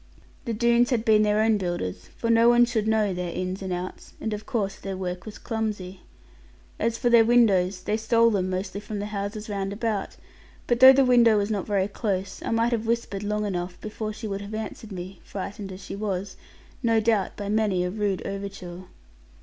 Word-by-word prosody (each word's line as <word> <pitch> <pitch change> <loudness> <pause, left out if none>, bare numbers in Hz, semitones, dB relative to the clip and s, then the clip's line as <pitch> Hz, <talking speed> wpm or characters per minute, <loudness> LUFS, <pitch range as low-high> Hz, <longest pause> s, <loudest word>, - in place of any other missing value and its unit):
The 230 - -2
Doones 235 +2 +3
had 235 -3 0
been 215 -1 +5
their 210 0 +3
own 220 -1 +3
builders, 95 - -4
for 230 - 0
no 230 +1 +6
one 240 0 +6
should 220 -2 -1
know 215 -3 +2
their 180 -1 -3
ins 185 +2 -3
and 190 -1 -4
outs; 180 +1 -6
and 220 - -3
of 210 0 -6
course 210 -7 -1
their 195 -1 -5
work 180 +1 -5
was 215 - -8
clumsy. 210 -5 -4 0.8
As 230 0 0
for 240 - +1
their 235 -1 +7
windows, 200 -6 +3
they 210 +1 0
stole 230 +1 +3
them 185 -3 0
mostly 185 +2 -3
from 210 0 -6
the 205 - -3
houses 210 +1 -4
round 200 -2 -3
about. 210 -1 -3 0.5
But 240 -1 +1
though 260 +1 +11
the 270 0 +4
window 235 -3 +5
was 205 +1 0
not 200 -3 -2
very 200 -2 +1
close, 195 -3 -3
I - - -3
might 230 +1 +2
have 225 -1 -1
whispered 230 -4 -1
long 210 0 -1
enough, 180 -2 -4
before 215 0 -5
she 215 +1 -6
would 200 -1 -4
have 205 +2 -6
answered 220 0 -6
me; 185 0 -7
frightened 200 0 -6
as 185 +1 -9
she - - -6
was, 200 -2 -3 0.5
no 230 -2 +3
doubt 220 -3 +1
by 205 - -5
many 205 -3 +1
a 180 - -2
rude 205 -2 -2
overture. 195 -2 -6
210 Hz, 205 wpm, -25 LUFS, 190-225 Hz, 0.8 s, though